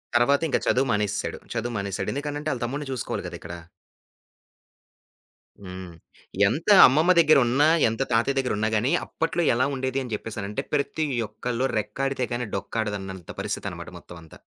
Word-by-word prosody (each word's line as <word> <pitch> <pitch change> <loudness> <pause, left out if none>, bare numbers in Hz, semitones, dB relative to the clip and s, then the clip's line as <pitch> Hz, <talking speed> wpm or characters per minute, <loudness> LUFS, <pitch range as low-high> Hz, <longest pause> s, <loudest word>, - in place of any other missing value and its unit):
తర్వాత, 140 +5 +4
ఇంక 145 - +1
చదువు 135 +2 +3
మానేసేసాడు. 105 0 -1
చదువు 120 +1 -3
మానేసాడు. 100 -1 -3
ఎందుకనంటే 145 +2 -3
ఆళ్ళ 125 - -6
తమ్ముడిని 140 +3 -4
చూసుకోవాలి 125 - -4
గదా! - - -7
ఇక్కడ. 85 - -8 2.1
హ్మ్. 95 -1 -8 0.6
ఎంత 160 - 0 0.2
అమ్మమ్మ 155 +7 +3
దెగ్గరున్నా, 140 -3 +5 0.2
ఎంత 110 0 -2
తాతయ్య 120 +5 +2
దెగ్గరున్నా 110 -5 0
గానీ, 125 +9 +1
అప్పట్లో 165 +1 -2
ఎలా 130 +3 +2
ఉండేది 130 0 -2
అని 125 -3 -7
జెప్పేసనంటే, 105 +3 -4
ప్రతి 150 +2 0 0.2
ఒక్కళ్ళు 120 +4 -2
రెక్కాడితే 130 +5 -2
గానీ, 120 0 -2
డొక్కాడదన్నంత 100 -3 -4
పరిస్థితనమాట, - - -4
మొత్తవంతా. 85 -2 -13
120 Hz, 130 wpm, -25 LUFS, 105-140 Hz, 2.1 s, దెగ్గరున్నా